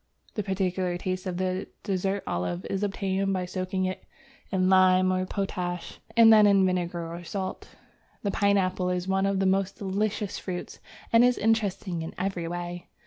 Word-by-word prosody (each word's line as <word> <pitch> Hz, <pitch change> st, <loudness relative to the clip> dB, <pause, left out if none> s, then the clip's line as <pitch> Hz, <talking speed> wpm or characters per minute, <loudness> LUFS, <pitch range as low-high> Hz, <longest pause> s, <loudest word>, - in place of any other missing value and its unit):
The 210 Hz, -, -1 dB
peculiar 185 Hz, -2 st, -1 dB
taste 185 Hz, +1 st, -3 dB
of 180 Hz, -1 st, -3 dB
the 185 Hz, 0 st, -1 dB, 0.2 s
dessert 195 Hz, 0 st, -1 dB
olive 90 Hz, 0 st, -2 dB
is 195 Hz, -, -1 dB
obtained 195 Hz, -1 st, -1 dB
by 185 Hz, -1 st, -1 dB
soaking 185 Hz, +1 st, -2 dB
it 185 Hz, 0 st, -4 dB, 0.5 s
in 185 Hz, -1 st, +2 dB
lime 185 Hz, 0 st, +5 dB
or 185 Hz, 0 st, -1 dB
potash, 180 Hz, -3 st, -3 dB, 0.2 s
and 225 Hz, -1 st, +9 dB
then 210 Hz, -1 st, +7 dB
in 195 Hz, -2 st, +5 dB
vinegar 175 Hz, -2 st, -2 dB
or 175 Hz, +1 st, -7 dB
salt. 190 Hz, +1 st, -5 dB, 0.5 s
The 200 Hz, -, 0 dB
Pineapple 190 Hz, -3 st, +1 dB
is 180 Hz, 0 st, -2 dB
one 190 Hz, 0 st, +2 dB
of 195 Hz, -1 st, 0 dB
the 195 Hz, -, +1 dB
most 190 Hz, 0 st, +1 dB
delicious 205 Hz, +1 st, -2 dB
fruits, 180 Hz, -2 st, -6 dB, 0.3 s
and 230 Hz, +1 st, +7 dB
is 250 Hz, 0 st, +4 dB
interesting 205 Hz, -5 st, 0 dB
in 160 Hz, -, -6 dB
every 180 Hz, -2 st, -2 dB
way. 175 Hz, 0 st, -5 dB
185 Hz, 170 wpm, -27 LUFS, 180-195 Hz, 0.5 s, and